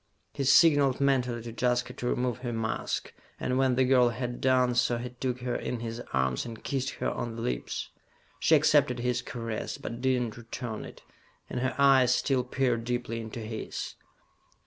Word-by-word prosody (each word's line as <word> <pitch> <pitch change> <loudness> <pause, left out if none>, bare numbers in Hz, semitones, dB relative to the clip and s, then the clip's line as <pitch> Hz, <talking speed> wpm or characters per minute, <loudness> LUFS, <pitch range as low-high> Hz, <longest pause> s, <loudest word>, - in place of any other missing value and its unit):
He 140 - -2
signalled 140 -2 +5
mentally 125 -4 +1
to 115 - -6
Jaska 125 +1 0
to 125 - -4
remove 125 0 0
her 120 -1 -4
mask, 115 -1 -2 0.3
and 125 +1 0
when 130 -2 +3
the 130 - +4
girl 125 -2 +5
had 120 +1 -4
done 130 -1 +3
so 120 -1 +2
he 125 +1 -5
took 125 0 -3
her 125 -1 -2
in 120 -2 -3
his 115 0 -4
arms 65 -1 +1
and 115 -2 -9
kissed 135 -1 -1
her - - -1
on 120 -1 -4
the 115 - -5
lips. 60 -1 -3 0.5
She 160 - +5
accepted 145 -4 +4
his 125 0 0
caress, 115 -2 -4
but 120 +1 -6
did 130 -1 +2
not 120 -2 -3
return 115 -1 -6
it, - - -12 0.5
and 125 - -2
her 130 +1 -1
eyes 135 -3 +5
still 135 -3 +1
peered 125 -2 0
deeply 120 -1 -2
into 115 +1 -7
his. 110 0 -5
125 Hz, 185 wpm, -29 LUFS, 115-130 Hz, 0.5 s, signalled